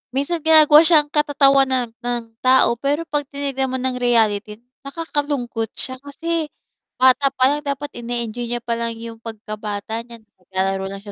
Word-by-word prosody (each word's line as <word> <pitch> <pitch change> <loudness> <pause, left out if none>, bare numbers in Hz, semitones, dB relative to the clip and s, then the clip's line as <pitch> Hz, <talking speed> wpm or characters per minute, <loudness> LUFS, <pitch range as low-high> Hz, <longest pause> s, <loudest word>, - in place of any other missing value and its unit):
minsan 285 +5 -1
ginagawa 310 -2 +7
siya 310 -4 +6
katatawanan 275 -5 +3
ng 240 -1 -3 0.2
tao 255 -2 +4
pero 290 +5 0
'pag 295 -3 -3
tinignan 275 -2 -3
mo 260 - -4
ng 255 -1 -2
reality 220 -2 +1 0.2
nakakalungkot 280 -7 -3
siya, 260 -1 -4
kasi 320 +3 -3 0.5
bata 260 +2 +4
palang 270 +3 +2
dapat 280 +1 -3
ine-enjoy 235 0 -4
niya 240 0 -3
palang 230 -1 -2
yung 230 0 -9
pagkabata 215 -1 -6
niya 235 -2 -13
na - - -38
naglalaro 190 +1 -2
lang 195 0 -8
siya 205 - -9
255 Hz, 150 wpm, -20 LUFS, 230-285 Hz, 0.5 s, ginagawa